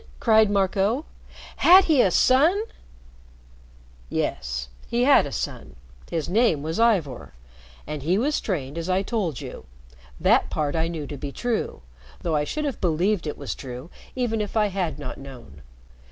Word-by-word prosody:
cried 220 -2 +4
Marco. 200 - +1 0.5
"Had 370 +3 +8
he 305 -7 +4
a 190 - +4
son?" 300 - +4 1.5
"Yes. 60 0 -2 0.2
He 240 +1 0
had 275 - +5
a - - -8
son. - - -5 0.3
His 160 -3 -2
name 180 -6 +2
was 160 +4 -3
Ivor. 185 - +1 0.5
And 150 -1 -5
he 170 +7 +1
was 290 +7 0
trained 155 -6 -3
as 165 +2 -4
I 185 +1 +2
told 195 - -2
you. - - -9 0.5
That - - +3
part 150 -1 -1
I 165 0 +1
knew 165 -3 -5
to 145 +1 -7
be 140 +1 -6
true, 235 - -3 0.4
though 165 -2 -1
I 150 0 +1
should 305 - -3
have 275 -6 -4
believed 175 +1 +1
it 150 - -4
was 140 -7 -4
true 130 +4 -9 0.2
even 235 -4 -1
if 210 +1 -3
I 210 -1 +3
had 180 -6 -2
not 150 - -7
known. 120 - -12
180 Hz, 165 wpm, -24 LUFS, 145-225 Hz, 1.5 s, Had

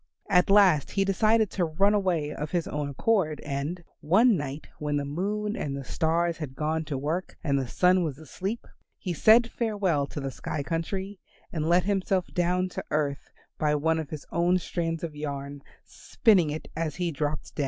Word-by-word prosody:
At 180 -1 +4
last 190 -8 +5
he 195 -1 +1
decided 215 +2 +3
to 185 - 0
run 195 +6 +2
away 175 -7 0
of 150 - -4
his 175 -1 -1
own 145 -1 -3
accord, 155 - +1
and, 150 +5 -4 0.2
one 210 +9 +4
night 145 -2 -4
when 150 -1 -1
the 145 - -2
Moon 205 +8 -2
and 140 -1 -3
the 140 - -5
Stars 165 +4 0
had 145 -5 -6
gone 155 +2 -1
to 145 -2 -3
work 155 +7 -3
and 140 -2 +1
the 130 - -3
Sun 180 +6 +3
was 150 -5 -3
asleep, 190 - -5 0.3
he 180 - -3
said 230 +7 +5
farewell 195 - 0
to 150 - -6
the 135 -1 -3
sky 145 +2 -4
country 190 +5 -3 0.3
and 160 -1 -1
let 175 +1 +4
himself 190 -1 0
down 180 0 +1
to - - -5
earth 145 -2 -1 0.3
by 150 -1 +2
one 160 +2 +1
of 155 -3 -5
his 150 -2 -7
own 175 +2 +3
strands 165 -2 -3
of 160 -3 -4
yarn, 140 -1 -5 0.2
spinning 190 -9 +2
it 155 +2 -5
as 160 -2 -2
he 175 -1 -1
dropped 150 0 -3
down. - - -10
165 Hz, 190 wpm, -27 LUFS, 150-190 Hz, 0.3 s, last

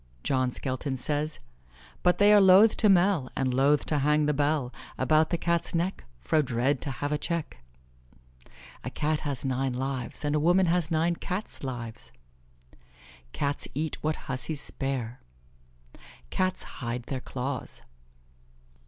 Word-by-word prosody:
John 130 -2 +1
Skelton 130 +2 -3
says: 150 +4 -2 0.6
"But 180 0 +3
they 205 +1 +6
are 205 - +7
lothe 195 +3 +7
to 215 - +4
mel, 180 -7 +3
And 130 -2 0
lothe 140 +3 +3
to 150 - 0
hang 150 +2 +3
the 150 - +2
bel 145 -3 0 0.2
About 155 +4 +3
the 170 - 0
Catte's 170 0 0
neck, 175 +3 -1
Fro 155 - +2
dred 130 0 0
to - - -3
have 145 +3 -3
a 150 - 0
checke" 170 0 -3 1.2
"A - - -3
Cat 155 0 -1
has 140 -3 -4
nine 130 0 0
lives, 130 +2 -3
and 145 - +1
a 150 - +2
woman 175 +5 +4
has 170 -1 +1
nine 165 +1 +1
Cats' 190 -2 -4
lives." 120 -4 -6 1.2
"Cats 140 - -2
eat 155 +1 -2
what 155 0 -2
hussies 140 +3 -2
spare." 130 -4 -4 1.1
"Cats 185 0 0 0.2
hide 120 0 -3
their 130 +1 -4
claws." 130 0 -4
145 Hz, 145 wpm, -28 LUFS, 130-165 Hz, 1.2 s, are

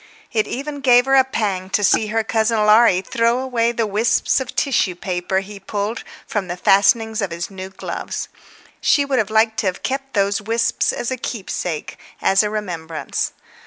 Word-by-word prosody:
It 220 -3 +1
even 285 +2 -5
gave 245 -2 +5
her 270 - +1
a 265 -1 +7
pang 200 -7 -2
to 205 - 0
see 215 +2 +3
her 225 +1 0
cousin 220 0 +1
Laurie 210 -3 +5
throw 235 +3 +1
away 245 -3 0
the 230 -1 -1
wisps 215 +6 +1
of 265 - -6
tissue 225 -10 +1
paper 180 +1 -2
he 200 +1 -10
pulled 205 +3 -3 0.2
from 205 -4 -3
the 175 0 -4
fastenings 215 +4 +3
of 200 - -1
his 170 +3 -5
new 190 -1 -7
gloves. 190 - -5 0.5
She 285 - +3
would 255 -7 0
like 220 0 +2
to 200 - 0
have 185 - -3
kept 270 -1 -3
those 200 0 +1
wisps 230 +2 0
as 240 - -3
a 260 - -2
keepsake, 185 -9 -4 0.2
as 195 0 +4
a 210 - -1
remembrance. 170 -7 -4
215 Hz, 180 wpm, -20 LUFS, 195-235 Hz, 0.5 s, a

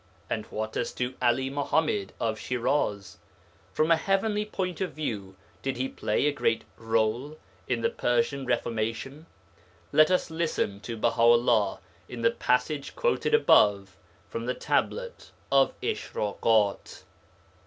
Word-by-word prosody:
And 110 -1 -2
what 110 0 -4
as 120 - -2
to 125 +1 -2
'Ali 130 +2 +2
Muḥammad 140 -7 0
of 110 -2 -1
Shiraz? 120 -6 -1 0.5
From 155 +2 +1
a - - +8
heavenly 205 +4 0
point 185 -3 -4
of 190 - -2
view, 105 -11 -4 0.3
did 135 -2 -2
he 130 +1 -1
play 110 0 -1
a 150 - +3
great 115 -5 0 0.2
rôle 115 +6 0 0.3
in 120 -2 -1
the - - +2
Persian 120 +2 0
Reformation? 120 +5 -2 0.6
Let 155 +2 +6
us 185 -2 +1
listen 160 -11 -1
to 115 +2 -6
Baha 115 +1 0
'ullah 115 -3 +4 0.3
in 235 - -6
the 230 - +5
passage 140 - -1
quoted - - +1
above 100 - +4 0.3
from 115 +1 -5
the 125 - -1
Tablet 485 0 -2 0.2
of 135 -1 +3
Ishrakat. 105 0 0
125 Hz, 135 wpm, -27 LUFS, 110-155 Hz, 0.6 s, a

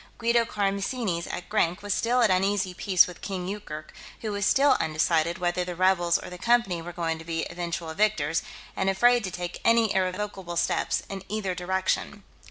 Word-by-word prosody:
Guido 235 0 +2
Karamessinis, 200 -2 -1
at 180 - -6
Grank, 195 -3 0
was 205 -1 0
still 245 +3 +1
at 215 - +4
uneasy 190 0 +1
peace 185 -1 +4
with 180 -1 -10
King 185 -3 -4
Yoorkerk, 155 -6 -7 0.3
who 220 - -3
was 205 0 0
still 285 0 +5
undecided 160 +1 +1
whether 180 0 0
the 180 0 -5
rebels 175 -1 +3
or - - -9
the 180 - -8
Company 235 -7 +2
were 175 +1 -7
going 165 -2 -2
to - - -9
be 165 0 -2
the - - -6
eventual 170 -1 -4
victors, 165 -6 +1 0.3
and 190 - +1
afraid 240 +5 +4
to - - -3
take 180 -1 -6
any 230 -2 +4
irrevocable 185 -1 -2
step - - 0 0.2
in 195 -1 -6
either 205 -3 -2
direction.... 190 +3 -2
185 Hz, 185 wpm, -26 LUFS, 175-210 Hz, 0.3 s, still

